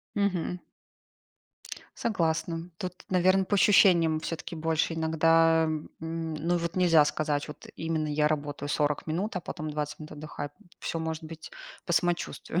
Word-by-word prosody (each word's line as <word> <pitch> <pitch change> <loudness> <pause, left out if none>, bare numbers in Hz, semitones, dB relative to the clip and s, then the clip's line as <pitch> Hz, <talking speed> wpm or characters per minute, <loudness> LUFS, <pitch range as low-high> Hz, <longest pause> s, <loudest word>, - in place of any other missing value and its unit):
Мгм. 185 -3 0 1.4
Согласна. 165 -4 -1
Тут, 185 -3 -4 0.2
наверно, 185 +1 +4
по 205 - -1
ощущениям 175 -5 +5
всё-таки 165 +1 -5
больше 160 +1 0
иногда, 165 0 +4
м, 155 -1 -3
ну, 165 +1 -2
вот 170 0 -2
нельзя 165 -4 +6
сказать 150 -1 -1
вот 150 - -10
именно: 160 -1 -1
"Я 150 0 +2
работаю 145 -1 -3
40 150 -1 0
минут, 185 +7 -2
а - - -1
потом 155 -1 -5
20 150 0 -3
минут 155 0 -9
отдыхаю". 150 -1 -6
М, - - -21
всё 165 - -3
может 160 0 -3
быть 160 0 -9 0.3
по 180 - -2
самочувствию. 175 0 0
165 Hz, 150 wpm, -28 LUFS, 155-175 Hz, 1.4 s, нельзя